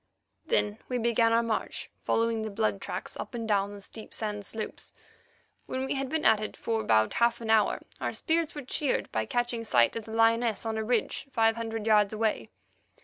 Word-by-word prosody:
Then 210 Hz, -, +1 dB
we 250 Hz, -, 0 dB
began 230 Hz, -1 st, +3 dB
our 230 Hz, +1 st, +4 dB
march, 225 Hz, -2 st, -3 dB
following 230 Hz, 0 st, +1 dB
the 220 Hz, -, -3 dB
blood 105 Hz, -, -1 dB
tracks -, -, -5 dB
up -, -, -6 dB
and 230 Hz, -1 st, -3 dB
down 200 Hz, -1 st, +1 dB
the -, -, -9 dB
steep 220 Hz, +2 st, -8 dB
sand 210 Hz, -2 st, -3 dB
slopes. 220 Hz, -1 st, -6 dB, 0.7 s
When 260 Hz, +1 st, -2 dB
we -, -, -1 dB
had 270 Hz, -1 st, -2 dB
been 315 Hz, +1 st, -1 dB
at 220 Hz, -, +6 dB
it 215 Hz, -, -5 dB
for 225 Hz, -1 st, -1 dB
about 110 Hz, -, +3 dB
half 235 Hz, 0 st, +2 dB
an 225 Hz, -1 st, -2 dB
hour 215 Hz, -2 st, +3 dB, 0.2 s
our -, -, -1 dB
spirits 325 Hz, -2 st, 0 dB
were 290 Hz, -, -5 dB
cheered 270 Hz, +2 st, -1 dB
by 110 Hz, 0 st, -1 dB
catching 240 Hz, -1 st, -1 dB
sight 120 Hz, -, +3 dB
of 225 Hz, -2 st, -4 dB
the 220 Hz, -, -8 dB
lioness 225 Hz, -1 st, +2 dB
on 220 Hz, -1 st, -1 dB
a -, -, -1 dB
ridge 240 Hz, +4 st, 0 dB
five 225 Hz, -2 st, +3 dB
hundred 225 Hz, -2 st, -4 dB
yards 210 Hz, -2 st, +4 dB
away. 215 Hz, -, -1 dB
225 Hz, 205 wpm, -29 LUFS, 215-235 Hz, 0.7 s, at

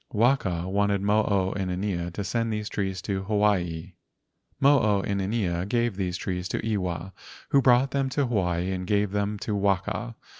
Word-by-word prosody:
Waka 105 Hz, -7 st, +1 dB
wanted 100 Hz, 0 st, +1 dB
Mo 105 Hz, +1 st, +3 dB
o 95 Hz, -2 st, +1 dB
inanea 90 Hz, -2 st, -2 dB
to 100 Hz, -, -3 dB
send 115 Hz, +3 st, -1 dB
these 105 Hz, 0 st, -3 dB
trees 95 Hz, -2 st, -3 dB
to 95 Hz, -2 st, -2 dB
Hawaii. 95 Hz, -5 st, 0 dB, 0.7 s
Mo 140 Hz, +1 st, +6 dB
o 105 Hz, -3 st, +2 dB
inanea 100 Hz, -3 st, -1 dB
gave 120 Hz, -2 st, +1 dB
these 90 Hz, -2 st, -2 dB
trees 90 Hz, -1 st, -3 dB
to 110 Hz, -, -3 dB
Iwa, 95 Hz, -1 st, -3 dB, 0.4 s
who 140 Hz, -, +4 dB
brought 130 Hz, +1 st, +4 dB
them 135 Hz, -1 st, 0 dB
to 140 Hz, +1 st, 0 dB
Hawaii 90 Hz, -6 st, 0 dB
and 90 Hz, -1 st, -4 dB
gave 105 Hz, -1 st, +1 dB
them 105 Hz, +1 st, -1 dB
to 105 Hz, -, -2 dB
Waka. 100 Hz, +4 st, -1 dB
100 Hz, 165 wpm, -26 LUFS, 95-110 Hz, 0.7 s, Mo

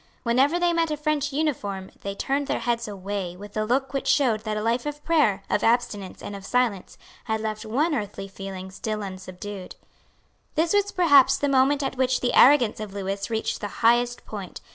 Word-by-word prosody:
Whenever 265 Hz, +7 st, +3 dB
they 350 Hz, -1 st, +2 dB
met 330 Hz, -1 st, +1 dB
a 300 Hz, -, -2 dB
French 300 Hz, -1 st, -1 dB
uniform 210 Hz, -11 st, -2 dB
they 200 Hz, 0 st, -4 dB
turned 275 Hz, +5 st, -1 dB
their -, -, 0 dB
heads 235 Hz, -1 st, -1 dB
away 195 Hz, -3 st, -5 dB
with 205 Hz, +1 st, -11 dB
a 215 Hz, -, +1 dB
look 265 Hz, +5 st, 0 dB
which 275 Hz, -, -2 dB
showed 245 Hz, -7 st, +3 dB
that 215 Hz, 0 st, -3 dB
a -, -, -2 dB
life 235 Hz, +4 st, 0 dB
of 295 Hz, 0 st, -6 dB
prayer, 255 Hz, -13 st, +2 dB
of -, -, 0 dB
abstinence 225 Hz, -5 st, 0 dB
and 205 Hz, -, -6 dB
of 195 Hz, -, -9 dB
silence 230 Hz, -4 st, -1 dB, 0.3 s
had 220 Hz, -1 st, -1 dB
left 215 Hz, 0 st, -4 dB
one 295 Hz, +9 st, +1 dB
earthly 205 Hz, -5 st, -4 dB
feeling 190 Hz, -1 st, -8 dB
still 215 Hz, +2 st, -4 dB
unsubdued. 185 Hz, 0 st, -8 dB, 0.8 s
This 330 Hz, +3 st, +2 dB
was 405 Hz, 0 st, +2 dB
perhaps 285 Hz, -7 st, +5 dB
the 285 Hz, -, 0 dB
moment 275 Hz, +1 st, +3 dB
at 265 Hz, -1 st, -3 dB
which 260 Hz, 0 st, +2 dB
the 245 Hz, -, 0 dB
arrogance 250 Hz, -6 st, +6 dB
of 210 Hz, -2 st, -7 dB
Lewis 195 Hz, +1 st, -3 dB
reached 220 Hz, -1 st, -2 dB
the 205 Hz, -, -2 dB, 0.2 s
highest 240 Hz, +1 st, +3 dB
point. 200 Hz, -4 st, -7 dB
230 Hz, 195 wpm, -25 LUFS, 200-280 Hz, 0.8 s, arrogance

